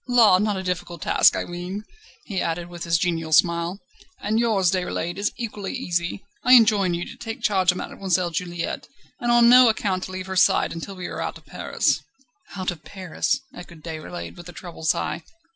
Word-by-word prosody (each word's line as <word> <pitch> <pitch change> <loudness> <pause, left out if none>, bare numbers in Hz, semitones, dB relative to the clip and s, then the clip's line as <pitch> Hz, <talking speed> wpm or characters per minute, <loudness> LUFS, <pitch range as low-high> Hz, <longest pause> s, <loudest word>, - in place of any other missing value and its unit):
La! 230 -7 +6
not 210 -1 0
a 190 - -4
difficult 180 -1 -4
task, - - +5
I - - -2
ween," 180 +4 -6 0.4
he 195 -4 -2
added, 170 +1 -2
with 175 -1 -7
his 170 0 +3
genial 165 -2 -1
smile; 170 +3 +3 0.4
"and 215 +2 0
yours, 205 -7 +2
Déroulède, 180 -1 -2
is 205 - 0
equally 210 -5 -5
easy. 175 -6 -2 0.2
I 250 - +6
enjoin 210 -7 +5
you 175 - -3
to - - -10
take 225 -1 -7
charge 190 -3 +2
of 180 - +3
Mademoiselle 185 -3 -1
Juliette, 175 0 -4 0.3
and 240 0 0
on 240 0 +6
no 250 0 +8
account 190 -4 -1
to - - -9
leave 185 0 -5
her 190 0 -5
side 185 - +3
until 170 +4 -7
we 180 -1 -6
are - - -5
out - - -3
of - - -20
Paris." - - 0 0.5
"Out 185 -2 -1
of 165 -3 -11
Paris!" 185 - -2
echoed 170 -3 -12
Déroulède, 165 +2 -7
with 175 0 -10
a - - -10
troubled 170 -2 -7
sigh. - - 0
185 Hz, 195 wpm, -24 LUFS, 175-205 Hz, 0.5 s, no